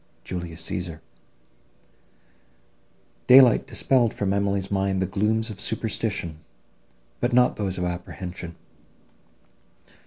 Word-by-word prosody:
JULIUS 85 Hz, -2 st, -5 dB
CÆSAR 85 Hz, -2 st, -4 dB, 2.3 s
Daylight 125 Hz, -2 st, +7 dB
dispelled 125 Hz, -4 st, +1 dB
from 100 Hz, -1 st, 0 dB
Emily's 100 Hz, -1 st, -1 dB
mind 95 Hz, -1 st, 0 dB
the 95 Hz, -, +1 dB
glooms 110 Hz, +4 st, 0 dB
of 100 Hz, -1 st, -7 dB
superstition, 105 Hz, -7 st, -2 dB, 0.8 s
but -, -, 0 dB
not 125 Hz, 0 st, +4 dB
those 95 Hz, -3 st, -3 dB
of 90 Hz, -, -2 dB
apprehension. 90 Hz, 0 st, -6 dB
95 Hz, 95 wpm, -24 LUFS, 90-110 Hz, 2.3 s, Daylight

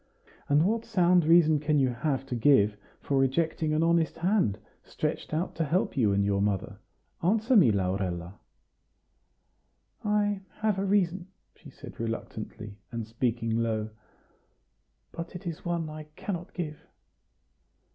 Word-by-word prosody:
And 145 Hz, +3 st, +4 dB
what 225 Hz, +3 st, +1 dB
sound 180 Hz, -6 st, +3 dB
reason 160 Hz, -2 st, +5 dB
can 150 Hz, 0 st, +1 dB
you 135 Hz, -2 st, +3 dB
have 135 Hz, +2 st, -2 dB
to 130 Hz, -, -4 dB
give 110 Hz, -4 st, +4 dB, 0.3 s
for 140 Hz, -1 st, 0 dB
rejecting 155 Hz, +3 st, +1 dB
an 155 Hz, +1 st, +2 dB
honest 165 Hz, -1 st, +2 dB
hand, 180 Hz, -, +1 dB, 0.2 s
stretched -, -, -4 dB
out 160 Hz, +4 st, -1 dB
to 165 Hz, -, +1 dB
help 165 Hz, +5 st, 0 dB
you 115 Hz, -7 st, +3 dB
and 100 Hz, 0 st, +2 dB
your 100 Hz, -1 st, +1 dB
mother? 100 Hz, 0 st, -1 dB, 0.4 s
Answer 220 Hz, +8 st, +2 dB
me, 160 Hz, -, +7 dB
Laurella." 95 Hz, -2 st, -2 dB, 1.6 s
"I 205 Hz, -2 st, +1 dB
have 210 Hz, -3 st, 0 dB
a 195 Hz, -, 0 dB
reason," 190 Hz, -2 st, +1 dB, 0.3 s
she -, -, -14 dB
said -, -, -12 dB
reluctantly, 110 Hz, -2 st, -6 dB
and 115 Hz, -2 st, -4 dB
speaking 115 Hz, 0 st, -1 dB
low; 110 Hz, -2 st, -1 dB, 1.2 s
"but 170 Hz, +2 st, -7 dB
it 180 Hz, -, -8 dB
is 165 Hz, -2 st, -5 dB
one 170 Hz, -2 st, -2 dB
I 155 Hz, 0 st, -8 dB
cannot 180 Hz, -3 st, -5 dB
give." 155 Hz, -4 st, -4 dB
155 Hz, 140 wpm, -28 LUFS, 110-175 Hz, 1.6 s, me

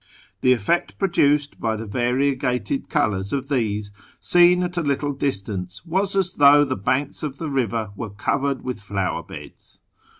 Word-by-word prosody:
The 130 Hz, -, +3 dB
effect 125 Hz, -, 0 dB
produced 145 Hz, -6 st, +1 dB
by 110 Hz, -1 st, -1 dB
the 110 Hz, +1 st, -6 dB
variegated 130 Hz, -, -1 dB
colours 100 Hz, -, 0 dB
of 135 Hz, 0 st, -3 dB
these, 105 Hz, -6 st, -1 dB, 0.3 s
seen 175 Hz, 0 st, +5 dB
at 180 Hz, 0 st, -3 dB
a 175 Hz, -, 0 dB
little 145 Hz, -1 st, -1 dB
distance, 100 Hz, -, -3 dB
was 190 Hz, +4 st, -1 dB
as 190 Hz, -2 st, +1 dB
though 145 Hz, 0 st, +6 dB
the -, -, -2 dB
banks 130 Hz, +8 st, -1 dB
of 145 Hz, -3 st, -4 dB
the 155 Hz, -1 st, -4 dB
river 115 Hz, -5 st, -1 dB
were 110 Hz, +2 st, -5 dB
covered 135 Hz, +7 st, -1 dB
with 125 Hz, -4 st, -5 dB
flower 100 Hz, -2 st, -2 dB
beds. -, -, -12 dB
135 Hz, 160 wpm, -22 LUFS, 110-150 Hz, 0.3 s, though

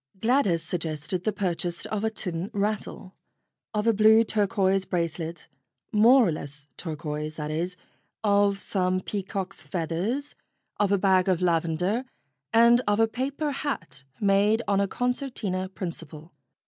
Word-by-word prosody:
Gladys 220 Hz, -8 st, +2 dB
suggested 165 Hz, +1 st, -3 dB
the 215 Hz, -, +2 dB
purchase 175 Hz, -3 st, -2 dB
of 215 Hz, -1 st, -3 dB
a 220 Hz, -, +2 dB
tin 180 Hz, -4 st, -4 dB
rattle, 205 Hz, -2 st, -2 dB, 0.6 s
of 210 Hz, -1 st, -1 dB
a 230 Hz, -, +4 dB
blue 220 Hz, +2 st, +6 dB
turquoise 195 Hz, -3 st, +1 dB
bracelet 170 Hz, -2 st, -3 dB, 0.4 s
more 230 Hz, +3 st, +6 dB
or -, -, +1 dB
less 145 Hz, -1 st, -8 dB
turquoise, 155 Hz, -2 st, -5 dB
that 150 Hz, -1 st, -4 dB
is 175 Hz, +4 st, -2 dB, 0.5 s
of 200 Hz, -1 st, +2 dB
some 185 Hz, -1 st, 0 dB
peacocks' 195 Hz, -1 st, -4 dB
feathers, 190 Hz, -, -2 dB, 0.5 s
of 205 Hz, -1 st, +2 dB
a 200 Hz, -, +4 dB
bag 190 Hz, -1 st, +3 dB
of 180 Hz, -3 st, +2 dB
lavender, 175 Hz, +5 st, +1 dB, 0.5 s
and 235 Hz, +2 st, +6 dB
of 205 Hz, +1 st, +2 dB
a 225 Hz, -, +5 dB
paper 275 Hz, +6 st, -2 dB
hat 165 Hz, -, -4 dB, 0.2 s
made 205 Hz, +2 st, +3 dB
on 200 Hz, -1 st, +2 dB
a 200 Hz, -, +1 dB
concertina 245 Hz, -6 st, -2 dB
principle. 165 Hz, -4 st, -7 dB
195 Hz, 135 wpm, -26 LUFS, 170-215 Hz, 0.6 s, blue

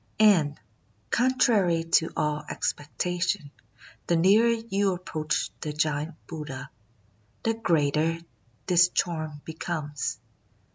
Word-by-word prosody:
And, 175 Hz, -9 st, +4 dB, 0.5 s
contrary 220 Hz, -9 st, +3 dB
to 165 Hz, 0 st, +2 dB
all 150 Hz, 0 st, 0 dB
expectation, 170 Hz, 0 st, -2 dB, 0.6 s
the 170 Hz, -, +3 dB
nearer 200 Hz, +8 st, +5 dB
you 205 Hz, -4 st, 0 dB
approach 165 Hz, -2 st, -2 dB
the 150 Hz, -, -4 dB
giant 155 Hz, +1 st, -1 dB
Buddha, 150 Hz, -5 st, -7 dB, 0.7 s
the 225 Hz, -, +2 dB
greater 165 Hz, -6 st, +1 dB, 0.5 s
this 180 Hz, -1 st, +5 dB
charm 155 Hz, -5 st, -2 dB
becomes. 160 Hz, -3 st, -4 dB
165 Hz, 95 wpm, -27 LUFS, 150-190 Hz, 0.7 s, nearer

